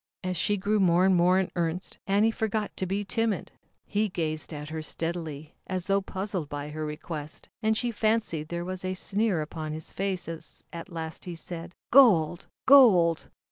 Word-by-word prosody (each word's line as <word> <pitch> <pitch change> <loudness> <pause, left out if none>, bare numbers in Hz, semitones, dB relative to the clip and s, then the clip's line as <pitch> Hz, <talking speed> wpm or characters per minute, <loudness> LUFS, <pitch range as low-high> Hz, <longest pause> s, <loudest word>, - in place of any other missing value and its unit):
As 185 0 -2
she 205 +5 +1
grew 205 +2 +1
more 180 -1 +4
and 190 -1 +5
more 180 +1 +4
in 190 -1 0
earnest, 170 +1 -2
Annie 205 +3 +3
forgot 220 -1 -2
to 185 - -2
be 200 +2 -1
timid. 225 -1 -1 0.3
He 210 +1 0
gazed 155 -3 -2
at 150 -1 -6
her 160 0 -4
steadily, 160 -2 -4
as 185 -1 -2
though 200 0 +2
puzzled 190 -5 -3
by 145 0 -5
her 155 +1 -5
request, 150 0 -6
and 220 -1 +2
she 240 0 -1
fancied 215 -8 0
there 170 +1 -4
was 185 0 -5
a 185 0 -2
sneer 195 -3 +1
upon 155 0 -5
his 155 0 -6
face 190 -2 -2
as 165 -1 -7
at 170 +3 -7
last 160 -1 -6
he 175 -2 -5
said: 170 +1 -7 0.2
"Gold! 185 - +5 0.2
Gold! 195 - +6
180 Hz, 180 wpm, -28 LUFS, 160-200 Hz, 0.3 s, Gold